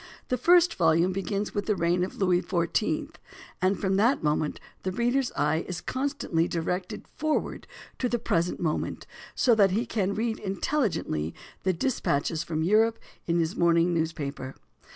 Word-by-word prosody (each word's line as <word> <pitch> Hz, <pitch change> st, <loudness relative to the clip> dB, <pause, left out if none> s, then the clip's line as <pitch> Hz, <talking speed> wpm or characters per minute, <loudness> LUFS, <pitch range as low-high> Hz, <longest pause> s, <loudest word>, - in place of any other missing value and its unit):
The 250 Hz, -, +1 dB
first 350 Hz, +5 st, +5 dB
volume 170 Hz, +1 st, +3 dB
begins 195 Hz, +2 st, -2 dB
with 205 Hz, -, -2 dB
the 210 Hz, -, +2 dB
reign 175 Hz, 0 st, +1 dB
of 185 Hz, -, -4 dB
Louis 180 Hz, -2 st, +2 dB
XIV; 215 Hz, -, -1 dB, 0.4 s
and 185 Hz, +2 st, +2 dB
from 190 Hz, -1 st, +1 dB
that 235 Hz, +7 st, +3 dB
moment 150 Hz, 0 st, 0 dB, 0.2 s
the 185 Hz, -, -2 dB
reader's 245 Hz, +5 st, +1 dB
eye 150 Hz, +3 st, +1 dB
is 180 Hz, -2 st, -4 dB
constantly 260 Hz, -, -1 dB
directed 180 Hz, +2 st, -3 dB
forward 310 Hz, 0 st, -1 dB, 0.3 s
to 250 Hz, -, 0 dB
the 240 Hz, -, +1 dB
present 170 Hz, -5 st, 0 dB
moment, 160 Hz, -3 st, -2 dB, 0.3 s
so 245 Hz, -, +4 dB
that 205 Hz, -3 st, +5 dB
he 215 Hz, +6 st, 0 dB
can 200 Hz, -3 st, -1 dB
read 225 Hz, 0 st, -1 dB
intelligently 190 Hz, -, -1 dB, 0.3 s
the 185 Hz, -, +2 dB
dispatches 165 Hz, -, 0 dB
from 160 Hz, -2 st, -2 dB
Europe 220 Hz, +5 st, +3 dB, 0.3 s
in 170 Hz, 0 st, +2 dB
his 165 Hz, +1 st, 0 dB
morning 170 Hz, 0 st, +3 dB
newspaper. 145 Hz, -5 st, -3 dB
185 Hz, 155 wpm, -27 LUFS, 165-225 Hz, 0.4 s, first